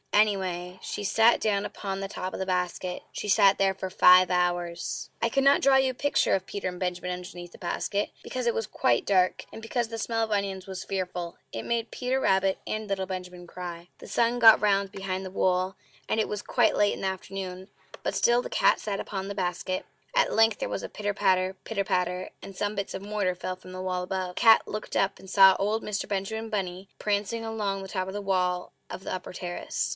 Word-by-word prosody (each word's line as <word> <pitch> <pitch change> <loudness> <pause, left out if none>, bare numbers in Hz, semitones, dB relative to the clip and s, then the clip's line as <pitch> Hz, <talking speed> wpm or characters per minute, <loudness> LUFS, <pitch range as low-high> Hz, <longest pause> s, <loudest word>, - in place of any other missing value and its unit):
Anyway, 185 -4 +1
she - - -4
sat 225 +4 +4
down 205 -2 +1
upon 195 -1 -4
the 195 - -3
top 185 -2 -5
of - - -5
the 190 - -1
basket. 180 0 -2
She - - -5
sat 195 0 +5
there 195 -1 +3
for 190 0 -5
FIVE 180 0 +7
HOURS. 175 -6 -1
I 230 - +2
cannot 275 +3 +4
draw 270 0 +5
you 265 -1 +3
a - - -13
picture 285 +3 +2
of 190 -1 -3
Peter 200 - -4
and 180 -1 -5
Benjamin 180 0 -2
underneath 175 -1 -7
the - - -13
basket, 200 +3 -2
because 255 -1 -4
it 235 - +2
was 225 - -2
quite 120 - +1
dark, 185 -2 +2
and - - -9
because 235 +1 -1
the 225 0 -6
smell 225 0 -1
of 220 - -3
onions 195 -2 -1
was 190 -1 -5
fearful; 180 -3 -4
it 115 - -5
made 235 -1 -1
Peter 255 +1 -1
Rabbit 190 -5 +2
and 215 0 -3
little 190 -1 -2
Benjamin 180 -1 -7
cry. 175 -1 -7
The - - -12
sun 235 +1 +1
got 225 -2 +8
round 200 -2 +2
behind 195 -1 -4
the 185 - -7
wood, 185 0 +1 0.3
and 220 - 0
it 220 - +1
was 210 -1 -4
quite - - +2
late 205 0 +3
in - - -7
the 195 - 0
afternoon; 190 0 -5 0.4
but - - -1
still 240 +1 +3
the - - -6
cat - - +3
sat 200 -2 -3
upon 195 -1 -4
the 200 - -5
basket. 185 0 -2 0.3
At - - +3
length 225 -1 +4
there - - -2
was 100 -1 -3
a - - -5
pitter 205 -1 -3
patter, 185 -1 +2
pitter 205 -3 -2
patter, 180 0 -1
and 195 - -9
some 205 +2 -2
bits 200 -1 -3
of - - -5
mortar 200 -2 -1
fell 185 +1 -4
from 185 0 -13
the 185 0 -6
wall 185 -1 -2
above. 185 -1 -3
The - - -3
cat 225 -2 +7
looked 215 - -5
up 195 0 +1
and 190 - -12
saw 190 -1 +7
old 215 +3 0
Mr. 210 -1 -3
Benjamin 220 +3 -3
Bunny 190 -2 -3
prancing 210 +2 -1
along 205 -3 -2
the 195 - -7
top 185 -1 -3
of 190 - -5
the 205 - -3
wall 180 -2 0 0.2
of 190 - -8
the - - -4
upper 185 0 -6
terrace. 175 -1 -3
195 Hz, 225 wpm, -27 LUFS, 185-210 Hz, 0.4 s, got